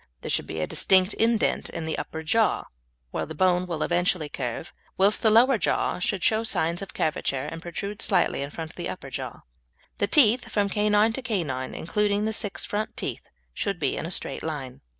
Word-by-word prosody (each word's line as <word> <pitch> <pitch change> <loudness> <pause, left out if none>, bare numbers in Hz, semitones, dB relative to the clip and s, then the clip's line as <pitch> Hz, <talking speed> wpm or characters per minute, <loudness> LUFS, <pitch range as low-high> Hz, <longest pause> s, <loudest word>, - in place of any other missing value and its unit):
There - - -4
should - - 0
be 80 - -5
a - - +1
distinct 185 - +3
indent 225 -1 +1
in 165 -1 -5
the 160 - -2
upper 160 0 -5
jaw, 220 +7 +2 0.5
where - - -3
the 160 - -7
bone 180 +2 +2
will 165 -3 -2
eventually 175 -3 +1
curve, 125 +4 -5 0.2
whilst 200 +2 +4
the 220 - +4
lower 235 +2 +5
jaw - - 0
should 185 0 -1
show 220 0 +3
signs 170 -5 +1
of 195 - -8
curvature 140 -3 -1
and 165 +2 -6
protrude 200 +5 -5
slightly - - +2
in 140 - -3
front 160 +1 -7
of - - -24
the - - -4
upper - - -7
jaw. - - -6 0.6
The 205 - +2
teeth 245 0 +4
from 205 -1 +1
canine 210 +2 +3
to 265 - -3
canine, 165 - -2
including 205 +4 0
the 220 - -1
six 205 -1 -2
front 215 +1 -3
teeth, - - -3 0.3
should 200 -3 -2
be 140 -5 0
in 160 - -4
a - - -5
straight 180 - -1
line. 135 -5 -5
185 Hz, 205 wpm, -26 LUFS, 160-210 Hz, 0.6 s, lower